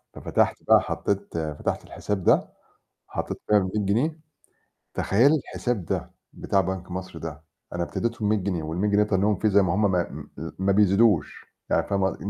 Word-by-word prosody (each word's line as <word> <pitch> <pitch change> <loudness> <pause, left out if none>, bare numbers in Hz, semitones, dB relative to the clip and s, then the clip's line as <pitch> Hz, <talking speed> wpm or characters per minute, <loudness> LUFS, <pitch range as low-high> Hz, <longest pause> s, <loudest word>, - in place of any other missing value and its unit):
ففتحت - - +1
بقى - - +6
حطّيت 100 -3 -2 0.2
فتحت - - -2
الحساب 100 -3 -4
ده - - +4 0.6
حطّيت - - -4
فيها 105 - +5
ال100 95 -2 0
جنيه، 135 +11 0 0.7
تخيّلي 125 +10 +4
الحساب 120 - -3
ده - - -3 0.2
بتاع 100 - +1
بنك 95 0 -4
مصر 95 -2 -6
ده 80 -2 -7 0.3
أنا 85 - 0
ابتديته 115 +6 -3
ب100 105 +1 +3
جنيه 90 -4 -2
وال100 85 +7 -1
جنيه 105 +1 +4
تنيّهم 105 0 +2
فيه 110 - +2
زي 100 0 +5
ما 95 -3 +1
هم 105 - +1
ما 90 -2 0
م - - -8
آآ 80 +1 -6
ما 95 +1 +2
بيزيدوش، 100 -4 +3 0.2
يعني - - +2
فاهمة 95 -1 +1
ق - - -9
إن 100 - -3
100 Hz, 180 wpm, -25 LUFS, 90-105 Hz, 0.7 s, بقى